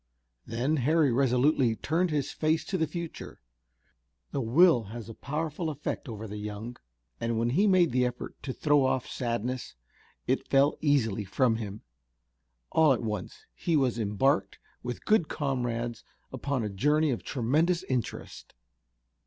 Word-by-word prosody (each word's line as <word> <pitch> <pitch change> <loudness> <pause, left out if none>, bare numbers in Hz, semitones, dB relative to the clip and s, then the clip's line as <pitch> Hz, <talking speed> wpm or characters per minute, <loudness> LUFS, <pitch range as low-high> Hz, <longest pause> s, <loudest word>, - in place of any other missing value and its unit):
Then 130 +7 0
Harry 150 +2 +3
resolutely 125 0 +3
turned 165 +9 0
his 145 -3 -1
face 155 +1 0
to 195 - -3
the 160 - +1
future. 170 +2 -7 0.9
The 140 - -1
will 125 +1 +5
has 110 +2 -8
a - - -7
powerful 155 +5 -3
effect 150 -1 -4
over 110 -1 -6
the 105 0 -6
young, 105 +3 -6 0.4
and 115 0 -1
when 115 +1 +1
he 195 +10 +3
made 185 -5 +4
the 125 +1 +2
effort 125 0 -6
to 130 - -4
throw 145 +1 +3
off 130 -1 0
sadness 120 - -3 0.5
it 130 +2 0
fell 140 +2 +4
easily 120 -9 +2
from 115 +4 +1
him. 105 -2 -6 0.9
All 155 -3 +5
at 120 - -3
once 105 -4 -5
he 160 - 0
was 125 -4 +1
embarked 105 -1 +1 0.2
with 125 0 -6
good 210 -7 +3
comrades 120 -5 -2 0.3
upon 130 -1 -2
a 105 - -2
journey 150 +9 +2
of 120 - -2
tremendous 155 +8 +1
interest. 125 - -4
130 Hz, 150 wpm, -29 LUFS, 115-150 Hz, 0.9 s, will